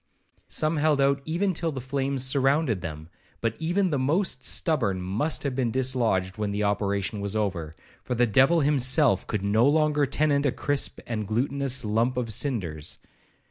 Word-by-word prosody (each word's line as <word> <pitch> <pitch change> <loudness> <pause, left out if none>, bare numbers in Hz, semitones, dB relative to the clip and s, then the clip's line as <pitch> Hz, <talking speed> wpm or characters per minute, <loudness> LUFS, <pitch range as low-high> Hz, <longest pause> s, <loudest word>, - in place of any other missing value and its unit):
Some 155 +1 0
held 150 -1 +2
out 140 0 +2
even 185 +4 0
till 165 0 -2
the 135 - -5
flames 135 0 -2
surrounded 135 - +1
them; 80 -2 -7 0.3
but 115 -2 -1
even 175 +3 0
the 145 - 0
most 145 0 0
stubborn 115 - +1
must 100 - -2
have 140 -2 -2
been 125 -2 0
dislodged 115 -7 0
when 105 -1 -1
the 100 +1 -2
operation 100 0 -1
was 100 +1 -4
over, 90 -7 -2 0.3
for 125 - -3
the 120 +1 +3
devil 135 +9 +4
himself 135 - +3
could 105 -3 -3
no 110 +5 +3
longer 150 -1 +2
tenant 145 0 +1
a - - +1
crisp 145 +2 -1
and 110 -3 -4
glutinous 135 +3 0
lump 115 +4 0
of 115 -3 -1
cinders. 95 - -1
130 Hz, 170 wpm, -26 LUFS, 105-145 Hz, 0.3 s, devil